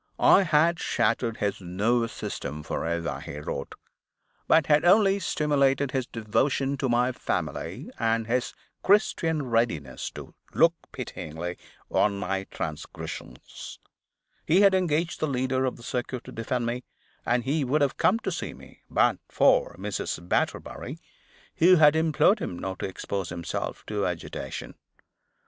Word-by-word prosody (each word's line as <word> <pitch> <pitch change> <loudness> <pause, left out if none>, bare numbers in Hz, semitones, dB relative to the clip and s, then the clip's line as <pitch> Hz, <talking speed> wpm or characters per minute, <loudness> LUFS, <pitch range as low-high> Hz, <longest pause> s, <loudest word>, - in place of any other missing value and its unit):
I - - +6
had 165 0 +3
shattered 115 -2 0
his 100 -1 -2
nervous 115 +6 0
system 75 +2 -5
forever, 85 -5 -2
he 70 - -8
wrote, 70 -2 -5 0.7
but 160 - +5
had 150 0 +4
only 195 +2 +5
stimulated 140 -5 +1
his 130 -2 -1
devotion 135 +5 0
to 135 -1 -1
my 120 +1 +2
family, - - -4
and 115 0 +1
his 120 +2 -1 0.3
Christian 165 -6 +2
readiness 115 - -1
to - - -9 0.2
look 165 0 +5 0.2
pityingly 85 +3 -6 0.3
on 100 -1 +2
my 95 0 -2
transgressions. 75 -7 -7 0.7
He 180 +5 +4
had 200 -1 +6
engaged 175 -2 +1
the 155 - 0
leader 130 -1 0
of 130 - -2
the 120 - -14
circuit 125 0 -3
to - - -10
defend 120 +2 -2
me; 120 +2 -2 0.4
and 120 0 +1
he 145 +4 0
would 140 +4 +1
have 140 - 0
come 205 - +3
to - - -2
see - - -4
me, - - -16
but - - +3
for - - +3
Mrs. - - -4
Batterbury; - - -2 0.6
who 180 +3 +7
had 150 -2 +6
implored 160 +6 +3
him 90 - -4
not 95 0 -5
to - - -2
expose 95 0 -4
himself 85 0 -4
to 105 -2 -1
agitation. 90 -2 -5
125 Hz, 145 wpm, -27 LUFS, 100-155 Hz, 0.7 s, who